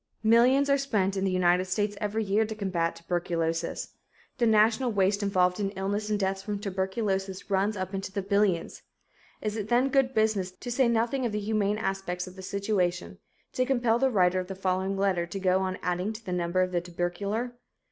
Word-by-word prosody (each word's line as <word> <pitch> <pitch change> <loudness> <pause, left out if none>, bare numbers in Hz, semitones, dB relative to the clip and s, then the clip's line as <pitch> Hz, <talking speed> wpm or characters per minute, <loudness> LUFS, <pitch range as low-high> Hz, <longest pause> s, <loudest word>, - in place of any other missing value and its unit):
Millions 245 +5 +5
are 280 0 +3
spent 200 -8 0
in 195 0 0
the 190 - +1
United 180 0 +3
States 205 +3 -1
every 215 +1 -1
year 205 +2 +2
to 220 0 -4
combat 185 -5 -1
tuberculosis. 165 -1 -2 0.5
The 235 - +3
national 220 +3 +3
waste 200 0 +2
involved 185 -2 +2
in 200 -1 0
illness 205 +3 -2
and 210 -1 0
deaths 190 -1 -1
from 205 +1 -3
tuberculosis 195 0 -2
runs 200 +2 +1
up 185 +1 -4
into 195 0 -4
the 195 0 -3
billions. 200 -3 0 0.6
Is 215 -1 -2
it 210 -2 -3
then 245 +4 +3
good 265 -1 +2
business, 215 -4 +1
to 245 +6 -7
say 255 +1 +3
nothing 235 +3 +1
of - - -4
the 210 - -1
humane 210 0 0
aspects 195 -3 -3
of 185 0 -11
the 190 - -9
situation, 185 - -1 0.3
to 255 - +1
compel 240 -3 +2
the 265 +1 +3
writer 185 -5 +3
of 180 - -4
the 195 - -6
following 190 +1 -1
letter 190 -3 +1
to 195 +3 -5
go 185 0 +2
on 185 -1 -2
adding 180 +4 -1
to 220 +1 -11
the 180 - -3
number 180 +1 +1
of 185 - -2
the 175 -1 0
tubercular? 200 +7 -3
195 Hz, 200 wpm, -28 LUFS, 185-220 Hz, 0.6 s, Millions